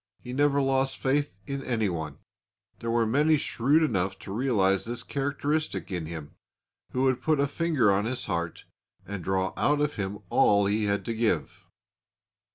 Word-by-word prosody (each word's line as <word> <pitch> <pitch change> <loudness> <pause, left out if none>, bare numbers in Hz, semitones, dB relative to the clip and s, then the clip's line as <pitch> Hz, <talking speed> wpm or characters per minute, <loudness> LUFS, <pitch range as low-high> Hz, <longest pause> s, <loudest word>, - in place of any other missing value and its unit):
He 125 - -8
never 140 +1 +3
lost 135 0 +1
faith 145 -3 0
in 140 -1 -4
anyone. 90 - -2 0.6
There 115 - -4
were 115 0 +2
many 150 +7 +3
shrewd 140 +4 +2
enough 95 - 0
to - - -8
realise 100 -6 +2
this 120 0 -4
characteristic 140 - -2
in 85 -4 -3
him, 80 -3 -7 0.6
who 130 - 0
would 130 -1 +2
put 155 0 +2
a 140 - +4
finger 145 -7 +2
on 100 +2 +1
his 125 +2 -2
heart 85 0 -3 0.4
and 100 -2 -6
draw 95 +1 0
out 145 0 +2
of 150 0 0
him 100 0 -3
all 100 -1 +4
he 105 +2 +1
had 100 0 0
to 115 - -2
give. 115 0 -1
120 Hz, 165 wpm, -27 LUFS, 95-140 Hz, 0.6 s, a